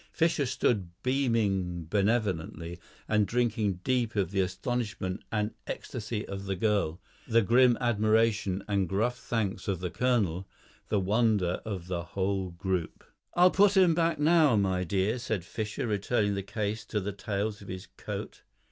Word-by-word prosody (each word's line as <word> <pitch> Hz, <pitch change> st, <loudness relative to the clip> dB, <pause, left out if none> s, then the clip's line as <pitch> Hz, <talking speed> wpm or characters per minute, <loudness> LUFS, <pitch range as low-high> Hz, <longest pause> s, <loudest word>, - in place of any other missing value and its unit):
Fischer 165 Hz, -4 st, +1 dB
stood 110 Hz, -7 st, 0 dB
beaming 105 Hz, -10 st, 0 dB
benevolently 90 Hz, -4 st, -1 dB, 0.3 s
and 105 Hz, -2 st, +2 dB
drinking 110 Hz, -6 st, 0 dB
deep 125 Hz, -3 st, 0 dB
of 95 Hz, -4 st, 0 dB
the 100 Hz, -, 0 dB
astonishment 95 Hz, 0 st, -3 dB
and 105 Hz, 0 st, 0 dB, 0.2 s
ecstasy 110 Hz, -2 st, -4 dB
of 100 Hz, 0 st, -6 dB
the 95 Hz, 0 st, -1 dB
girl, 100 Hz, -4 st, 0 dB, 0.3 s
the 115 Hz, -1 st, +4 dB
grim 120 Hz, +3 st, +5 dB
admiration 110 Hz, -4 st, +2 dB
and 100 Hz, -4 st, 0 dB
gruff 120 Hz, +6 st, 0 dB
thanks 105 Hz, -5 st, -2 dB
of 95 Hz, -4 st, -1 dB
the 90 Hz, -1 st, -3 dB
colonel, 100 Hz, -8 st, 0 dB, 0.4 s
the 105 Hz, -, +2 dB
wonder 100 Hz, -2 st, +1 dB
of 95 Hz, -5 st, -4 dB
the 90 Hz, -1 st, -2 dB
whole 95 Hz, +1 st, -2 dB
group. 90 Hz, -1 st, -3 dB, 0.3 s
"I'll 180 Hz, +1 st, +6 dB
put 200 Hz, 0 st, +4 dB
'em 180 Hz, -3 st, +6 dB
back 165 Hz, -1 st, +1 dB
now, 155 Hz, -3 st, +5 dB
my 95 Hz, -3 st, +1 dB
dear," 100 Hz, +6 st, 0 dB
said 110 Hz, -7 st, -3 dB
Fischer, 110 Hz, +6 st, -4 dB
returning 105 Hz, 0 st, +1 dB
the 100 Hz, -, -2 dB
case 105 Hz, +2 st, -3 dB
to 110 Hz, -, -2 dB
the 100 Hz, +1 st, -3 dB
tails 105 Hz, 0 st, -3 dB
of 100 Hz, -, -11 dB
his 95 Hz, +2 st, -6 dB
coat. -, -, -6 dB
105 Hz, 155 wpm, -29 LUFS, 95-120 Hz, 0.4 s, I'll